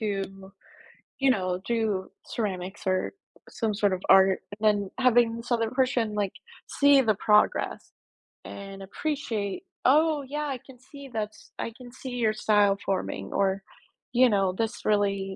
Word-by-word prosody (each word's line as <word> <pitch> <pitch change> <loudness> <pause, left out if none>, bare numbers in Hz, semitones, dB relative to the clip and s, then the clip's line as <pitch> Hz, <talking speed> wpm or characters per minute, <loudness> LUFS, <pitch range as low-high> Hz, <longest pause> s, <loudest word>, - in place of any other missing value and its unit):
to 195 -2 -4 0.7
you 270 -1 +3
know, 185 -5 0
do 220 -5 0 0.2
ceramics 190 -3 -4
or 185 0 0 0.3
some 220 -3 -2
sort 200 -2 +2
of 185 - -3
art 190 0 +6
and 215 +1 -4
then 205 -2 +2
having 240 -2 +4
this 235 +2 -9
other 230 -2 +2
person 250 -4 +1
like 200 -2 0 0.4
see 285 -1 +5
the 220 -3 +3
progress 210 +1 +2 0.5
and 195 0 -8
appreciate, 220 - -3 0.2
"Oh 305 +3 +4
yeah, 300 +1 -3
I 275 -3 -3
can 260 0 -16
see 280 +2 -12
that's, 215 -1 -5
I 230 - -3
can 250 -1 -12
see 260 0 -8
your 225 -3 +2
style 205 -2 +3
forming," 95 - -3
or 195 0 +1 0.5
you 250 +1 +6
know, 195 -4 +2
"this 225 +4 -3
really" 205 -2 +2
215 Hz, 150 wpm, -27 LUFS, 195-250 Hz, 0.7 s, art